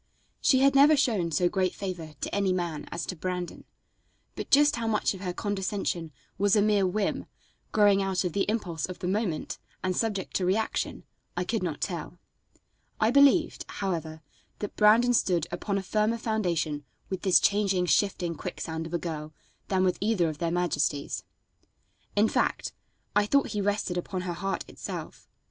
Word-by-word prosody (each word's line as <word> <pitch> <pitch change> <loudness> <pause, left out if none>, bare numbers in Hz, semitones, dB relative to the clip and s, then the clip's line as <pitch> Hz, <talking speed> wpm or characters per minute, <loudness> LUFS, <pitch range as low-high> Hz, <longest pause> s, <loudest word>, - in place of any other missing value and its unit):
She 260 -1 +4
had 275 0 +5
never 290 +2 +6
shown 220 -11 +1
so 170 +3 +2
great 185 0 0
favor 175 -5 -5
to - - -3
any 200 -2 +2
man 170 -4 -3
as 170 0 -3
to 185 - -4
Brandon, 180 +1 -4 0.7
but - - -6
just 290 -1 +5
how 230 -1 -2
much 215 -2 +1
of 190 - -9
her 180 -2 -2
condescension 190 -4 -2 0.3
was 205 +1 +4
a 210 - +4
mere 205 -2 +3
whim, 200 +2 -1 0.4
growing 205 -2 +4
out 190 -1 0
of 180 -3 -2
the 200 - 0
impulse 180 -8 -2
of 185 - -7
the 180 - -4
moment, 190 -4 -2 0.2
and 185 -1 0
subject 205 -4 -1
to 190 - -2
reaction, 215 +5 -1 0.3
I - - +1
could - - -1
not - - -3
tell. - - -4 0.8
I 220 +1 +3
believed, 280 +5 +4
however, 160 -5 -4 0.3
that 205 - -5
Brandon 225 +4 +5
stood 180 -8 +2
upon 195 +3 -2
a 195 - -2
firmer 215 +4 +1
foundation 175 -10 -1 0.3
with 190 - -2
this 190 -3 +5
changing, 200 -3 +2
shifting, 180 -2 +1
quicksand 160 +1 -5
of 170 - -4
a - - +3
girl 155 -3 -5 0.3
than 190 -1 +1
with 185 -1 +1
either 200 -6 +2
of 150 -1 -7
their 170 - 0
majesties. 165 -4 0 0.9
In 210 +2 +4
fact, - - 0 0.4
I 205 0 +3
thought 280 +4 +3
he 210 - -2
rested 200 -2 -1
upon 185 +1 -4
her 180 -1 -3
heart 195 +3 -3
itself. - - -7
190 Hz, 175 wpm, -28 LUFS, 175-210 Hz, 0.9 s, never